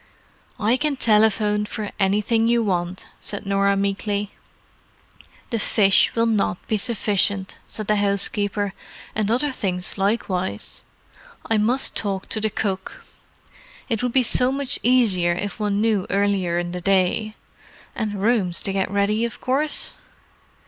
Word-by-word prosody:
"I 220 Hz, +4 st, +2 dB
can 295 Hz, 0 st, 0 dB
telephone 210 Hz, -3 st, +3 dB
for 210 Hz, 0 st, -5 dB
anything 210 Hz, +3 st, +2 dB
you 235 Hz, 0 st, +3 dB
want," 180 Hz, -2 st, -2 dB
said 205 Hz, 0 st, -4 dB
Norah 200 Hz, 0 st, +2 dB
meekly. 200 Hz, +1 st, -1 dB, 1.2 s
"The 230 Hz, -, 0 dB
fish 195 Hz, -2 st, +3 dB
will 230 Hz, 0 st, +3 dB
not 210 Hz, -5 st, +1 dB
be 220 Hz, -, 0 dB
sufficient," 205 Hz, -3 st, 0 dB
said 215 Hz, -, -3 dB
the 210 Hz, +1 st, +2 dB
housekeeper. 205 Hz, 0 st, 0 dB, 0.4 s
"And 215 Hz, -1 st, -1 dB
other 260 Hz, +5 st, +1 dB
things 185 Hz, -5 st, -3 dB
likewise. 195 Hz, -2 st, -1 dB, 0.6 s
I 225 Hz, -1 st, +1 dB
must 240 Hz, +6 st, +2 dB
talk 195 Hz, -2 st, -3 dB
to 215 Hz, -, -1 dB
the 220 Hz, -, +1 dB
cook. 195 Hz, -3 st, -4 dB, 0.8 s
It 225 Hz, -3 st, 0 dB
would 250 Hz, -1 st, 0 dB
be 260 Hz, -, +4 dB
so 250 Hz, +2 st, +2 dB
much 280 Hz, 0 st, +1 dB
easier 205 Hz, -9 st, +3 dB
if 200 Hz, +4 st, -4 dB
one 205 Hz, -1 st, 0 dB
knew 215 Hz, -4 st, +1 dB
earlier 195 Hz, -3 st, +1 dB
in 175 Hz, 0 st, -2 dB
the 180 Hz, 0 st, -5 dB
day. 195 Hz, +3 st, +1 dB, 0.6 s
And 210 Hz, -3 st, -3 dB
rooms 205 Hz, -7 st, +2 dB
to 195 Hz, -, -1 dB
get 195 Hz, -1 st, 0 dB
ready, 200 Hz, +3 st, +1 dB
of 235 Hz, -, -3 dB
course?" 280 Hz, +4 st, -1 dB
205 Hz, 140 wpm, -22 LUFS, 195-225 Hz, 1.2 s, be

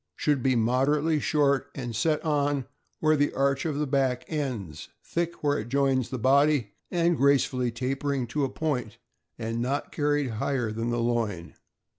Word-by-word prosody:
— -, -, -58 dB
Should 145 Hz, -3 st, +1 dB
be 130 Hz, 0 st, +2 dB
moderately 140 Hz, +7 st, +2 dB
short, 140 Hz, -2 st, +1 dB
and 120 Hz, -4 st, -5 dB
set 150 Hz, +8 st, 0 dB
on 145 Hz, -3 st, +1 dB, 0.4 s
where 155 Hz, 0 st, +4 dB
the 145 Hz, 0 st, +2 dB
arch 140 Hz, +2 st, +1 dB
of 155 Hz, -3 st, -1 dB
the 150 Hz, -, 0 dB
back 135 Hz, -3 st, 0 dB
ends, 120 Hz, -, -4 dB
thick 170 Hz, -1 st, -3 dB
where 145 Hz, -1 st, +2 dB
it 110 Hz, +2 st, -6 dB
joins 135 Hz, -2 st, +1 dB
the 130 Hz, -, -3 dB
body, 135 Hz, -2 st, +3 dB, 0.2 s
and 170 Hz, -1 st, +2 dB
gracefully 135 Hz, -3 st, +2 dB
tapering 135 Hz, +2 st, -2 dB
to 145 Hz, +4 st, -1 dB
a 135 Hz, -, 0 dB
point, 130 Hz, -7 st, -3 dB, 0.4 s
and 115 Hz, 0 st, -3 dB
not 135 Hz, +4 st, -2 dB
carried 145 Hz, -3 st, 0 dB
higher 125 Hz, -6 st, 0 dB
than 115 Hz, +2 st, -2 dB
the 120 Hz, -, 0 dB
loin. 115 Hz, -7 st, -1 dB
135 Hz, 170 wpm, -27 LUFS, 120-145 Hz, 0.4 s, where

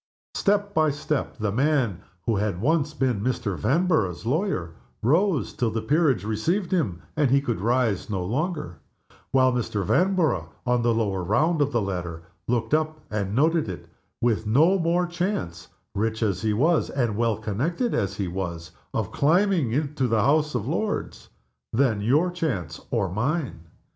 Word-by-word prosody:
Step 205 Hz, 0 st, +1 dB
by 155 Hz, -1 st, +3 dB
step 145 Hz, 0 st, -2 dB
the 105 Hz, -3 st, -1 dB
man 125 Hz, -, +1 dB, 0.2 s
who 115 Hz, -3 st, +1 dB
had 100 Hz, -3 st, -1 dB
once 150 Hz, -, +1 dB
been 125 Hz, -8 st, 0 dB
Mr. 115 Hz, -4 st, -1 dB
Vanborough's 125 Hz, -, +1 dB
lawyer 125 Hz, -, -1 dB, 0.3 s
rose, 165 Hz, -, +2 dB
till 120 Hz, -, 0 dB
the 110 Hz, +1 st, -2 dB
peerage 145 Hz, -, +2 dB
received 160 Hz, -, -1 dB
him, 115 Hz, -, 0 dB
and 150 Hz, -4 st, +2 dB
he 135 Hz, +2 st, +5 dB
could 120 Hz, -8 st, -2 dB
rise 115 Hz, -3 st, +1 dB
no 95 Hz, -4 st, -2 dB
longer; 150 Hz, -, -2 dB, 0.5 s
while 130 Hz, -1 st, +4 dB
Mr. 110 Hz, -5 st, -1 dB
Vanborough, 160 Hz, -, +2 dB, 0.2 s
on 125 Hz, -1 st, +2 dB
the 120 Hz, 0 st, +2 dB
lower 100 Hz, -5 st, 0 dB
round 150 Hz, -, +2 dB
of 145 Hz, 0 st, +2 dB
the 120 Hz, -3 st, +1 dB
ladder, 90 Hz, -4 st, -4 dB, 0.2 s
looked 115 Hz, +1 st, 0 dB
up, 155 Hz, 0 st, +1 dB
and 100 Hz, -1 st, -2 dB
noted 155 Hz, -, +2 dB
it, 90 Hz, -, -7 dB, 0.3 s
with 110 Hz, -2 st, +1 dB
no 160 Hz, -, +4 dB
more 170 Hz, +1 st, +2 dB
chance 175 Hz, -, -3 dB, 0.3 s
(rich 110 Hz, +2 st, -1 dB
as 100 Hz, -3 st, 0 dB
he 110 Hz, -1 st, +1 dB
was 155 Hz, +10 st, +2 dB
and 120 Hz, -6 st, -1 dB
well 115 Hz, -1 st, +1 dB
connected 135 Hz, -, -1 dB
as 100 Hz, -4 st, -1 dB
he 100 Hz, -, -1 dB
was) 85 Hz, -2 st, -5 dB, 0.2 s
of -, -, -1 dB
climbing 155 Hz, -, +2 dB
to 135 Hz, -4 st, 0 dB
the 110 Hz, -3 st, +2 dB
House 150 Hz, 0 st, +2 dB
of 115 Hz, -2 st, -2 dB
Lords 205 Hz, +8 st, -3 dB, 0.4 s
than 110 Hz, -4 st, +2 dB
your 150 Hz, -, +2 dB
chance 155 Hz, -, -3 dB
or 95 Hz, -, 0 dB
mine. 120 Hz, -, -2 dB
125 Hz, 165 wpm, -25 LUFS, 105-155 Hz, 0.5 s, he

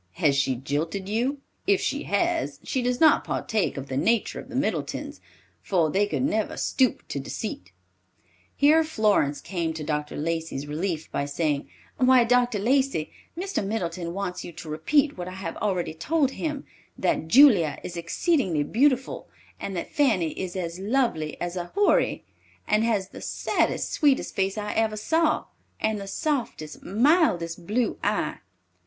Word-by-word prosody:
Has 150 Hz, -6 st, +2 dB
she 135 Hz, -1 st, +1 dB
jilted 155 Hz, +9 st, -3 dB
you? 250 Hz, +7 st, -1 dB, 0.3 s
If 400 Hz, -1 st, +4 dB
she -, -, -2 dB
has, -, -, 0 dB
she 260 Hz, -, -1 dB
does 245 Hz, 0 st, 0 dB
not 315 Hz, -2 st, +6 dB
partake 215 Hz, -8 st, -1 dB
of 135 Hz, 0 st, -5 dB
the 130 Hz, -, -3 dB
nature 215 Hz, +9 st, +1 dB
of 260 Hz, -, -10 dB
the 260 Hz, -, -8 dB
Middletons, 275 Hz, +3 st, -2 dB, 0.4 s
for 170 Hz, -5 st, +1 dB
they 205 Hz, +4 st, +2 dB
could 205 Hz, -, -1 dB
never 220 Hz, -6 st, 0 dB
stoop 260 Hz, -3 st, +1 dB
to 140 Hz, -, -3 dB
deceit." 135 Hz, -, -6 dB, 0.8 s
Here 310 Hz, +3 st, +5 dB
Florence 210 Hz, -, +1 dB
came 170 Hz, -4 st, -2 dB
to 155 Hz, -, -5 dB
Dr. 150 Hz, -1 st, -3 dB
Lacey's 160 Hz, -2 st, -2 dB
relief 160 Hz, +2 st, -3 dB
by 140 Hz, -, -1 dB
saying, 145 Hz, 0 st, -1 dB, 0.3 s
"Why, 255 Hz, -1 st, +6 dB
Dr. 245 Hz, -1 st, +2 dB
Lacey, 260 Hz, -, +1 dB, 0.3 s
Mr. 385 Hz, -, -2 dB
Middleton 175 Hz, -4 st, -3 dB
wants 195 Hz, -2 st, -3 dB
you -, -, -7 dB
to 160 Hz, -, -9 dB
repeat 275 Hz, -, +1 dB
what 175 Hz, -, -4 dB
I 185 Hz, -, -7 dB
have 190 Hz, -4 st, -5 dB
already 185 Hz, -6 st, -1 dB
told 280 Hz, -, +1 dB
him, 300 Hz, -1 st, -4 dB, 0.3 s
that 160 Hz, -, 0 dB
Julia 200 Hz, -, +6 dB
is 175 Hz, -, -6 dB
exceedingly 170 Hz, -, +1 dB
beautiful 260 Hz, -, +1 dB, 0.3 s
and 195 Hz, -, -4 dB
that 170 Hz, -, -5 dB
Fanny 210 Hz, -, +2 dB
is 185 Hz, -1 st, -5 dB
as 175 Hz, -1 st, -4 dB
lovely 200 Hz, -, 0 dB
as 175 Hz, 0 st, -3 dB
a 175 Hz, -1 st, -5 dB
Houri, 410 Hz, 0 st, +2 dB, 0.4 s
and 215 Hz, +1 st, +3 dB
has 215 Hz, -5 st, 0 dB
the -, -, -10 dB
saddest, -, -, -1 dB
sweetest 285 Hz, -3 st, +2 dB
face 195 Hz, +1 st, 0 dB
I 210 Hz, 0 st, -3 dB
ever 220 Hz, -1 st, +1 dB
saw, 320 Hz, +9 st, +1 dB, 0.3 s
and 215 Hz, -1 st, 0 dB
the 195 Hz, -, -7 dB
softest, 245 Hz, -, -3 dB
mildest 195 Hz, -, +2 dB
blue 230 Hz, +1 st, 0 dB
eye." 205 Hz, +1 st, 0 dB
200 Hz, 160 wpm, -26 LUFS, 165-255 Hz, 0.8 s, not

